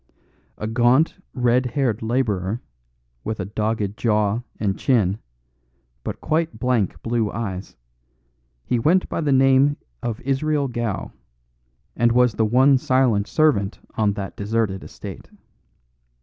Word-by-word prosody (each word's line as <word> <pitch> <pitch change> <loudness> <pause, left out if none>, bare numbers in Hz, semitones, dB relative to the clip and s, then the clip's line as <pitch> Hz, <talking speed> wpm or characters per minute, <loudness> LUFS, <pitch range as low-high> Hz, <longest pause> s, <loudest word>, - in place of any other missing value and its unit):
A - - -4
gaunt, 120 - +3 0.2
red 125 0 +2
haired 125 -4 -1
labourer, 110 -4 -1 0.6
with 110 -1 -4
a 95 - -2
dogged 105 0 -2
jaw 105 0 +1 0.2
and 100 -3 0
chin, 110 -6 +1 0.8
but - - -5
quite 160 +1 0
blank 125 -7 0
blue 115 -2 0
eyes, 100 -4 -5 0.9
he 120 - +1
went 175 +10 +3
by - - -2
the 150 -3 +1
name 135 +2 +4 0.2
of 115 -2 -3
Israel 140 +1 0
Gow, 120 -6 -3 0.8
and 120 0 +3
was 125 -1 +4
the 110 - +1
one 130 +4 +5
silent 125 -6 +2
servant 130 -11 +2 0.2
on 105 -3 +1
that 100 -1 -6
deserted 105 -2 -1
estate. - - -9
120 Hz, 125 wpm, -22 LUFS, 105-130 Hz, 0.9 s, one